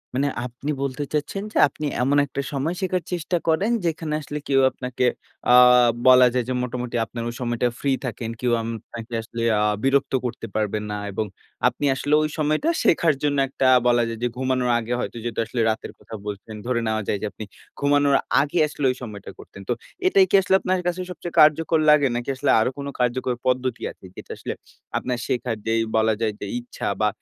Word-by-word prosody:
মানে 140 +2 +1 0.2
আপনি 125 +5 -5
বলতে 140 +1 -2
চাচ্ছেন 175 +7 -2
যে, - - -2
আপনি 150 +2 -7 0.2
এমন 140 +3 +2
একটা 140 - -4
সময় 145 +5 -1
শেখার 185 -1 -1
চেষ্টা 175 0 -1
করেন 190 +8 +2
যেখানে 160 -2 -2
আসলে 150 +1 -5
কেউ 135 -1 +3
আপনাকে 125 0 -2 0.5
আ - - +7 0.5
বলা 125 -1 +8
যায় 125 -2 0
যে - - 0
মোটামুটি 125 -1 -4
আপনার 115 0 -6
ওই - - -6
সময়টা 120 0 0
ফ্রি 140 - 0
থাকেন। 115 -2 -4
কেউ 125 -1 0
আম 115 - -5 0.2
আপনাকে 115 0 -9
আসলে 115 +1 -7 0.2
আ - - +2 0.2
বিরক্ত 135 0 +2
করতে 120 -1 -4
পারবে 105 0 0
না 105 - -2
এবং 110 +3 -2 0.4
আপনি 145 - -2
আসলে 145 +2 -1
ঐ - - +1
সময়টা 155 - +1
শেখার 165 -2 +4
জন্য 145 -1 +1
একটা 135 -1 0 0.2
বলা 120 -1 +4
যায় 115 -1 -5
যে - - +3
ঘুমানোর 130 -1 0
আগে 120 +2 -3
হয়তো 120 - -4
যেটা 115 -2 -3
আসলে 120 - -2
রাতের 110 - -3
কথা 110 - -10
বলছেন, 105 +1 -6
ধরে 125 -1 0
নেওয়া 110 0 0
যায় 105 - 0
যে - - -2
আপনি 110 - -8 0.4
ঘুমানোর 145 -1 +3 0.3
আগে 150 +4 -1
আসলে 145 -2 -4
ওই - - -5
সময়টা 105 -4 -8
করতেন। 100 - -12
তো - - +3 0.3
এটাই 195 - +5
কি - - +3
আসলে 190 +1 +2
আপনার 185 0 0
কাছে 180 +1 -1
সবচেয়ে 175 0 -7
কার্যকর 155 +1 +4
লাগে? 145 -2 +6
নাকি 120 +3 -3
আসলে 145 +2 +1
আরো 110 - +2
কোন 140 0 -5
কার্যকর 125 +1 0
পদ্ধতি 130 -1 0
আছে - - -17
যেটা - - -10
আসলে - - -4 0.4
আপনার 125 -1 -2
শেখার 120 -2 -1
যেই 115 0 +2 0.2
বলা 110 0 +3
যায় 110 -2 0
যে - - -5
ইচ্ছা 120 - -6
বা 105 - +4
130 Hz, 200 wpm, -23 LUFS, 120-150 Hz, 0.5 s, বলা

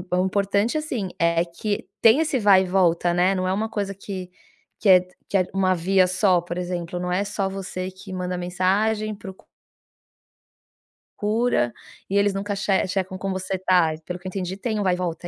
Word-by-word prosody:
o 180 - +2
importante, 200 +6 +1
assim, 250 -11 -3
é 170 0 +2
que 200 +4 -4
tenha 230 +7 +6
esse 305 -4 0
vai 200 -3 +6
e - - -3
volta, 175 -2 +2
né, 180 +2 +3
não 185 -1 -1
é 185 - +1
uma 215 +3 -1
coisa 205 -2 -3
que 190 -2 -7 0.5
que - - 0
é 185 -1 +9 0.3
que - - -5
é 185 - +3
uma 190 -1 +2
via 185 +2 +3
só, 185 0 +3
por 175 0 -6
exemplo, 175 0 -4
não 180 0 -3
é 185 +3 +1
só 200 -1 -2
você 190 -1 -5
que 190 +1 -11
manda 180 0 -3
mensagem, 200 +5 0
procu 190 -2 -11 1.7
cura, 210 - +1 0.4
e 195 - -2
eles 200 0 +3
nunca 200 +1 -3
che 195 -1 +1
checam 185 0 -2
como 195 +1 -3
você 185 0 -3
tá, 180 -3 +3
pelo 180 - -4
que 185 - -9
eu - - -2
entendi, 185 -1 -4
tem 215 +1 -2
o - - 0
vai 185 -2 +2
e - - -7
volta, 175 -1 -4
190 Hz, 200 wpm, -23 LUFS, 180-200 Hz, 1.7 s, é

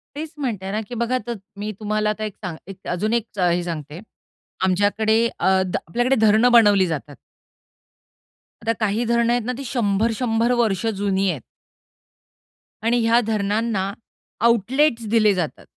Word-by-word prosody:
तेचं 305 0 -7
म्हणते 205 -8 -3
ना, 215 +2 -1
की 245 - -5
बघा 235 +2 0
त 240 - -2 0.3
मी 210 +1 -3
तुम्हाला 215 0 0
आता 215 +1 -3
एक 215 -2 -4
सांग 180 -4 -4
एक 195 0 -11
अजून 210 +5 -1
एक 235 -2 +1
हे 175 -1 +2
सांगते. 155 -2 -6 0.6
आमच्याकडे 215 +4 +2
अ, 190 0 +3
ध 180 - -4
आपल्याकडे 245 +9 +1
धरणं 220 +4 +5
बनवली 205 -5 +6
जातात. 145 -2 -5 1.5
आता 225 +1 +1
काही 215 +1 0
धरणं 235 0 +2
आहेत 240 -2 -1
ना, 250 - -1
ती 275 - -6
100-100 230 0 0
वर्ष 220 -4 +1
जुनी 195 -1 0
आहेत. 155 -8 -3 1.4
आणि 235 +2 +2
ह्या 230 +1 +5
धरणांना 205 -1 -1 0.5
आउटलेट्स 235 +2 +2
दिले 215 -2 +4
जातात 175 -5 -4
215 Hz, 150 wpm, -22 LUFS, 195-235 Hz, 1.5 s, बनवली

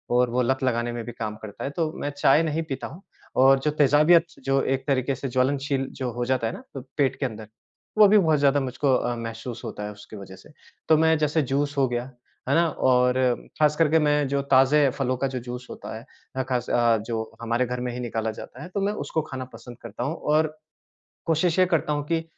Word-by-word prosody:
और 125 0 +3
वो 125 +2 +1
लत 130 +2 0
लगाने 120 -1 0
में 120 -1 -5
भी 120 - -6
काम 110 -2 -5
करता 105 -1 -8
है, - - -2
तो 155 +1 -2
मैं 145 - -1
चाय 145 +2 +5
नहीं 160 +1 -1
पीता 135 - -4
हूँ। 165 +7 -12 0.3
और 135 +1 +6
जो 150 +2 0
तेज़ाबियत, 150 +4 +5 0.2
जो 135 0 +2
एक 135 0 -1
तरीक़े 135 0 +1
से 135 +1 -5
ज्वलनशील 135 +1 0
जो 125 -2 -2
हो 120 0 -2
जाता 125 -2 0
है 115 - -3
ना - - -9
अ, - - -2 0.2
पेट 140 -3 +2
के - - 0
अंदर, 110 -3 -6 0.5
वो 210 -1 +8
भी 210 +1 +5
बहुत 160 -6 +3
ज़्यादा 140 0 +3
मुझको 130 +1 0
अ, 120 0 -1
महसूस 115 +1 -6
होता 105 - -6
है 105 - -5
उसके 105 +1 -12
वज़ह 95 -1 -10
से। - - -17 0.4
तो 160 - +6
मैं 160 0 +4
जैसे 150 +1 +1
जूस 140 +2 -1
हो 135 -1 +3
गया, 120 0 -2 0.5
है - - +3
ना, 170 0 +4
और 125 -3 +2 0.5
ख़ास 150 -1 +4
करके 160 0 +3
मैं 150 -1 +2
जो 140 +1 0
ताज़े 135 +2 +5
फलों 130 -1 -1
का 135 - 0
जो 130 -1 -4
जूस 125 +1 -7
होता - - -8
है 115 - -12 0.3
अ, 130 - 0
ख़ास 125 -2 -2
अ, 120 -1 +3
जो 110 -1 -3
हमारे 115 +2 0
घर 125 0 -4
में 125 - -2
ही 125 - -5
निकाला 115 -2 -2
जाता 125 +4 -10
है, - - -7
तो 200 +2 -3
मैं 205 +1 0
उसको 160 - -2
खाना 130 -1 -4
पसंद 120 -2 -11
करता 110 -3 -6
हूँ। 160 +4 -2
और 155 +1 0 0.7
कोशिश 165 +2 +1
ये 185 - +5
करता 165 -4 0
हूँ 145 -1 -2
कि 165 -1 0
135 Hz, 235 wpm, -25 LUFS, 120-150 Hz, 0.7 s, वो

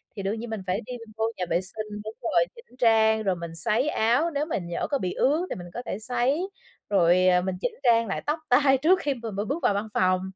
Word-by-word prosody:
thì 200 - -5
đương 210 +3 -2
nhiên 235 - -6
mình 220 -3 -4
phải 190 +5 0
đi 250 - -7 0.2
vô 220 - +1
nhà 180 - -1
vệ 175 - +2
sinh 210 +2 -5
đúng 215 - -5
rồi, - - +2
chỉnh 470 - -17
trang 220 -2 +4
rồi 190 -2 +1
mình 170 -1 -7
sấy 230 - +1
áo, 250 +10 +2
nếu 290 +1 -1
mình 190 - -3
nhỡ 170 - -2
có 280 - +2
bị 185 -8 -3
ướt 310 +7 +1
thì - - -3
mình 175 -1 -8
có 245 - -3
thể 205 - -4
sấy, 255 - 0 0.4
rồi, 185 -2 +4
à, 180 -1 +5
mình 185 0 -2
chỉnh 245 - -2
trang 230 -2 +4
lại 195 - -2
tóc 300 +2 0
tai 270 +1 +5
trước 340 +8 +4
khi 285 - 0
mà 230 -2 -6
mà 200 +1 -2
bước 290 +8 -3
vào 205 - +3
văn 205 +2 -2
phòng. 185 0 +2
220 Hz, 260 wpm, -26 LUFS, 190-265 Hz, 0.4 s, à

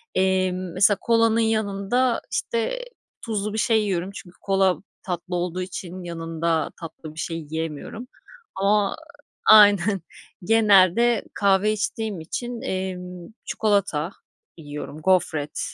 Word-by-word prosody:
Emm, 185 -1 +1
mesela 195 +2 +4
kolanın 230 -1 +3
yanında, 220 +2 +1
işte, 370 - -2 0.4
tuzlu 210 -2 -3
bir - - -3
şey 220 -1 +3
yiyorum 190 -1 -2
çünkü 185 -5 -11
kola 190 -3 +2 0.3
tatlı 180 -1 -4
olduğu 180 +1 -2
için 185 0 -6
yanında 165 -1 -2
tatlı 160 -1 -9
bir - - -8
şey 165 0 -3
yiyemiyorum 160 - -5 0.5
ama 200 +1 +2 0.5
Aynen, 205 -3 +6 0.4
genelde 215 +1 +4
kahve 200 +1 +3
içtiğim 215 -2 -3
için, 240 +9 -5
emm, 180 -2 -5 0.2
çikolata 200 -6 0 0.5
yiyorum, 150 0 -8
gofret, 160 -5 +1
190 Hz, 110 wpm, -24 LUFS, 175-215 Hz, 0.5 s, Aynen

